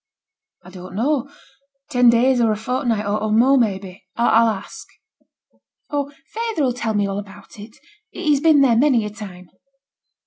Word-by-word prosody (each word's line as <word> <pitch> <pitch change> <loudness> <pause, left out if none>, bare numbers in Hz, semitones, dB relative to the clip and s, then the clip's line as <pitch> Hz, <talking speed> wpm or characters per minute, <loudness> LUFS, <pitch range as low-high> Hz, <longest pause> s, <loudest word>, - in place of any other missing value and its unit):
'I 180 - -13
don't 185 0 -11
know; 275 +4 -1 0.6
ten 245 -2 +5
days 245 +2 +3
or 225 -2 +3
a - - 0
fortnight, 230 -1 -2
or 215 +1 -1
more, 245 +6 +4
maybe. 195 -6 -2
I'll 230 -1 +3
ask.' 205 -3 -7 1.0
'Oh! 285 -1 -2 0.2
feyther 450 -9 -1
'll 250 - 0
tell 230 -3 -3
me 205 -1 +1
all 200 0 -3
about 200 +1 -13
it. 215 +2 -12 0.3
He's 300 -6 0
been 315 -3 +5
there 255 -4 +4
many 245 -3 +3
a 210 - -5
time.' 185 -4 -11
230 Hz, 160 wpm, -20 LUFS, 205-270 Hz, 1.0 s, ten